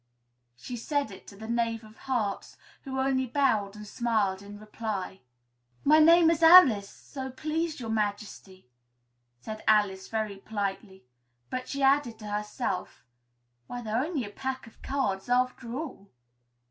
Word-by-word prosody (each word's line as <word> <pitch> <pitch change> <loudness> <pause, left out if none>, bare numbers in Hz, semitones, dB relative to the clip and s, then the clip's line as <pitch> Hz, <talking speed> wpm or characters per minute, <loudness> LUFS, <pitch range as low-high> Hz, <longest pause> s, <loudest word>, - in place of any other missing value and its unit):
She 240 - -7
said 285 0 -1
it 190 - -13
to - - -11
the 220 +2 -9
Knave 230 -1 -1
of 215 0 -15
Hearts, 230 -7 -3 0.3
who 265 -1 -4
only 265 -1 +1
bowed 225 -7 +1
and 210 0 -9
smiled 210 -4 0
in 205 +1 -10
reply. 210 -3 -5 0.6
"My 305 +2 +6
name 330 +1 +7
is 335 -1 -1
Alice, 295 - +8
so 265 -2 -8
please 310 +4 -3
Your 225 -3 -4
Majesty," 205 - -4 0.7
said 215 - -7
Alice 205 -3 +3
very 215 -3 -3
politely; 195 - -5 0.5
but 255 0 -3
she 275 0 -2
added 270 -4 +3
to 215 - -11
herself, 210 -2 -3 0.6
"Why, 245 0 -6
they're 225 +3 0
only 300 -6 -2
a 205 - -9
pack 265 +4 -4
of 225 - -18
cards, 245 -7 -2
after 250 -1 0
all!" 260 -10 -7
225 Hz, 145 wpm, -28 LUFS, 205-265 Hz, 0.7 s, Alice